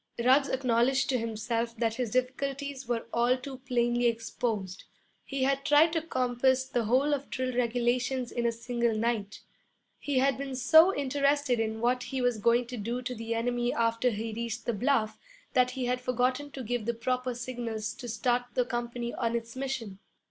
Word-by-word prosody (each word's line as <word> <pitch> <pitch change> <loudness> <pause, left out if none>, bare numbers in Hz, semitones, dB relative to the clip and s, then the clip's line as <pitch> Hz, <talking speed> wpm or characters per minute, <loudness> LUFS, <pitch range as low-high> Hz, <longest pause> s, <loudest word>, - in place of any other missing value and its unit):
Ruggs 260 +4 +4
acknowledged 255 +1 +2
to 255 -2 +2
himself 230 +1 -2
that 225 0 +1
his 245 -1 -2
difficulties 270 +2 -2
were 235 -2 -1
all 240 +2 +3
too 260 0 -8
plainly 240 -2 +1
exposed. 225 -4 -3 0.4
He 275 -1 -3
had 275 +1 +1
tried 305 +3 +5
to 325 - +1
compass 255 -3 +1
the 245 -3 -1
whole 265 +6 +3
of 280 -1 -3
drill 255 -1 -2
regulations 245 +1 0
in 235 0 0
a - - +2
single 235 0 -1
night. 215 -2 -2 0.6
He 285 -2 -1
had 270 0 +2
been 275 -1 -4
so 320 +8 +6
interested 280 -2 +1
in 220 0 -2
what 250 +1 +2
he 265 +1 -4
was 245 -3 +1
going 235 +3 +3
to 245 +1 -7
do 235 +4 -3
to 250 - -3
the 230 0 -4
enemy 240 +1 0
after 230 +1 +2
he 225 0 -4
reached 235 +1 -4
the 235 - 0
bluff, 220 -2 0 0.3
that 250 -1 +4
he 255 0 -3
had 250 0 -1
forgotten 255 +3 0
to 265 - -6
give 240 -1 -2
the 235 - 0
proper 250 +1 -1
signals 235 -3 -4
to 245 - -9
start 240 +2 +1
the 250 - +2
company 240 -1 -3
on 230 -1 -1
its 230 0 -4
mission. 260 -7 -4
245 Hz, 185 wpm, -29 LUFS, 230-260 Hz, 0.6 s, so